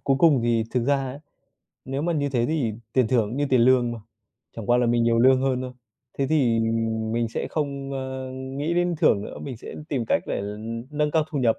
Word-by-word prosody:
cuối 135 -1 +3
cùng 150 -4 +5
thì 115 -1 +2
thực 125 -2 0
ra 140 +1 +3
á, 135 +1 -5 0.6
nếu 135 +2 -3
mà 170 +1 0
như 145 -2 0
thế 120 -3 0
thì 145 -8 0 0.2
tiền 130 -4 +3
thưởng 115 -4 +2
cũng 120 - -5
như 145 0 +1
tiền 130 -2 +4
lương 120 -1 +4
mà, 115 - -6 0.6
chẳng 115 - -6
qua 120 +1 +4
là 125 - +2
mình 120 0 +2
nhiều 115 0 +3
lương 130 +2 +5
hơn 130 -2 +1
thôi. 125 - -6 0.5
Thế 135 - +1
thì, 130 -7 +2
ừm, 115 0 -1
mình 115 -1 0
sẽ - - -3
không, 140 -2 -3
ơ, 130 -1 -4
nghĩ 135 +5 -3
đến 175 0 +1
thưởng 100 - +3
nữa, - - -8
mình 130 -4 -6
sẽ - - -9
tìm 130 -5 -1
cách - - +2
để - - -2 0.5
nâng 150 0 0
cao 155 -1 +2
thu 145 - -2
nhập, 115 -3 +2
130 Hz, 240 wpm, -24 LUFS, 115-140 Hz, 0.6 s, cùng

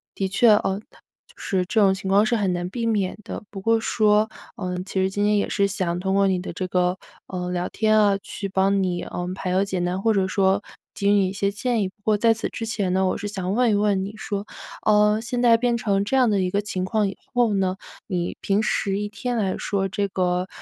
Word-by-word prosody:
的 190 -1 -1
确， 235 +5 +3
呃， 205 -2 +3
就 - - -24
是 185 -2 -1
这 220 +4 +1
种 195 -2 +5
情 190 0 -6
况 200 +2 +4
是 240 0 +1
很 195 -4 0
难 175 0 -3
避 230 +3 -3
免 205 -4 0
的。 - - -6
不 195 - -7
过 225 +4 +2
说， 215 -1 +2 0.3
嗯， 180 -1 -4
其 190 -1 -1
实 190 - +1
今 205 +1 -1
天 210 0 +3
也 200 - 0
是 200 -1 +2
想 185 -3 -2
通 190 +1 -1
过 195 -1 +3
你 185 - +1
的 180 - -6
这 185 - -3
个， 180 +1 +1 0.3
呃， 180 -1 -4
聊 180 0 -1
天 215 0 +2
啊 205 -2 +4
去 200 - -5
帮 195 +1 +2
你， 180 -2 -1
嗯， 180 +1 -4
排 185 0 -4
忧 190 +2 +2
解 190 -2 -3
难 180 +2 -1
或 225 0 +3
者 195 -2 +2
说 195 +1 +2 0.3
给 200 - -1
予 - - +5
你 200 -2 +4
一 185 - -4
些 200 0 0
建 230 +2 -1
议。 190 - -1
不 - - -29
过 215 -1 +2
在 225 +1 +4
此 225 - -3
之 225 - -5
前 205 -5 -1
呢， 190 0 +2
我 185 - 0
是 205 - -5
想 190 -2 -3
问 245 0 +3
一 205 - +3
问 205 -2 +1
你 205 - -7
说， 205 -1 -4 0.4
呃， 210 0 +4
现 245 +1 -3
在 230 -2 +6
变 240 0 +1
成 200 -3 0
这 235 - -1
样 255 -3 +4
的 205 - +2
一 185 -1 0
个 200 +2 0
情 185 -3 -3
况 210 0 +1
以 195 - -8 0.2
后 240 -4 +2
呢， 190 -1 0 0.3
你 175 -3 -2
平 200 +2 +1
时 195 -2 0
一 205 0 -3
天 245 +3 -3
来 195 -4 0
说 195 -1 -1
这 200 +2 -1
个 180 -1 -1
200 Hz, 270 characters per minute, -23 LUFS, 190-215 Hz, 0.4 s, 在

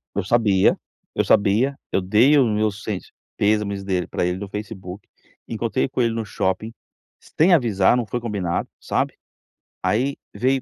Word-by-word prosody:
Eu 100 - 0
sabia, 100 -2 +3 0.4
eu - - +1
sabia, 110 +7 +3
eu 95 - +1
dei 110 +10 +4
o 135 - +5
meu 105 0 +1
sent 100 -1 -5 0.3
pêsames 100 -1 +1
dele 95 -2 -1
pra - - -1
ele 90 +1 -1
no 100 +1 -6
Facebook, 100 -2 -7 0.4
encontrei 115 +2 -1
com 130 -1 -2
ele 115 -1 +1
no 115 -1 -3
shopping, 100 +3 -2 0.5
sem 175 +4 +2
avisar, 115 - +3
não 120 - -1
foi 120 - -3
combinado, 100 -7 -2
sabe, - - -1 0.7
aí 130 +6 +1 0.2
veio 130 +5 +1
105 Hz, 160 wpm, -22 LUFS, 100-120 Hz, 0.7 s, o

